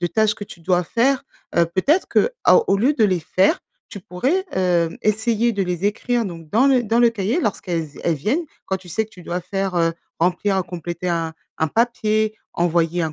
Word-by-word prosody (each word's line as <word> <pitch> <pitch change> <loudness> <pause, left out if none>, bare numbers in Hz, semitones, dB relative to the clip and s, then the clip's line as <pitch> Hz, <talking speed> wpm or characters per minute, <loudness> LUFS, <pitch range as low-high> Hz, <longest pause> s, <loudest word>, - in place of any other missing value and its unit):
de 175 - +1
tâches 215 +3 +2
que 205 - -7
tu 175 - -13
dois 180 +1 +2
faire, 265 +6 +1 0.3
heu, 170 - +5
peut-être, 275 - +1
que 480 - +3
à - - +7
au - - +4
lieu 245 +9 +3
de 225 - +3
les 185 -4 +2
faire, 190 - +2 0.3
tu 200 - -9
pourrais, 265 - -1
hem, 175 -3 +1
essayer 220 +2 +1
de 200 -2 -1
les 180 +1 -3
écrire 235 +3 0
donc 165 -4 -8
dans 240 +6 +4
le 260 -3 +4
dans 225 +1 +1
le 240 -1 +6
cahier 225 - -1
lorsqu'elles 175 - -2 0.2
elles 170 - +2
viennent. 225 - -1 0.2
Quand 190 - 0
tu 185 -1 -16
sais 220 +7 0
que - - -28
tu 180 - -14
dois 175 +2 -3
faire, 195 +1 -3
heu, 165 -1 +2 0.3
remplir 185 +3 +1
ou - - +1
compléter 175 0 -5
un 165 -1 -1 0.3
un 160 - +1
papier, 215 0 +1 0.2
envoyer 170 0 +1
un 160 -1 -2
195 Hz, 215 wpm, -21 LUFS, 175-225 Hz, 0.3 s, à